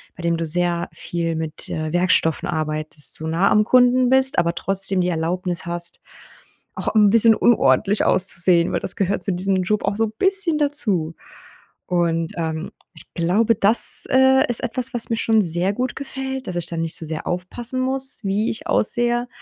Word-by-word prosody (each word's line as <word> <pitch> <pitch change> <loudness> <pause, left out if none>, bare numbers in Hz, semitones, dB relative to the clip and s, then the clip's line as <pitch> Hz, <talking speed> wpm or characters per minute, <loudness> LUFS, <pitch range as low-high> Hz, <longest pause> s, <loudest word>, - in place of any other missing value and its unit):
bei - - -11
dem 170 -1 -1
du 165 - -4
sehr 175 +1 0
viel 165 -1 -5
mit, 160 -1 -6
äh, 155 -1 -4
Werkstoffen 175 -2 0
arbeitest 155 -3 -4
so 160 - -6
nah 170 +5 +1
am 210 - +3
Kunden 250 0 +3
bist, 265 +1 +1
aber 170 0 0
trotzdem 195 0 -1
die 180 - -1
Erlaubnis 175 +1 -3
hast, 170 0 -1 0.8
auch - - -3
'n 210 -2 +4
bisschen 230 0 +6
unordentlich 215 -3 +1
auszusehen, 175 -2 +2
weil - - -1
das 190 - -6
gehört 200 0 -2
zu 195 - +1
diesem 185 +1 -1
Job 210 +3 -2
auch 200 - -2
so 225 0 0
bisschen 345 - 0
dazu. 205 - -1 0.7
Und, 165 -2 -1
ähm, 160 0 -5 0.2
ich - - -13
glaube, 195 +7 +1
das, 205 +4 +7
äh, 265 0 +3
ist 240 - -1
etwas, 250 +2 -4
was 240 -1 -4
mir 225 - -2
schon 225 -1 +1
sehr 175 +2 0
gut 250 +3 -4
gefällt, 265 -1 -7
dass 180 - -6
ich 175 - -4
da 170 - -7
nicht 165 0 -3
so - - -8
sehr 155 0 -6
aufpassen 235 +8 -5
muss, 265 -1 +2
wie 200 +3 -1
ich 225 - -7
aussehe. 240 +2 0
190 Hz, 180 wpm, -20 LUFS, 170-240 Hz, 0.8 s, das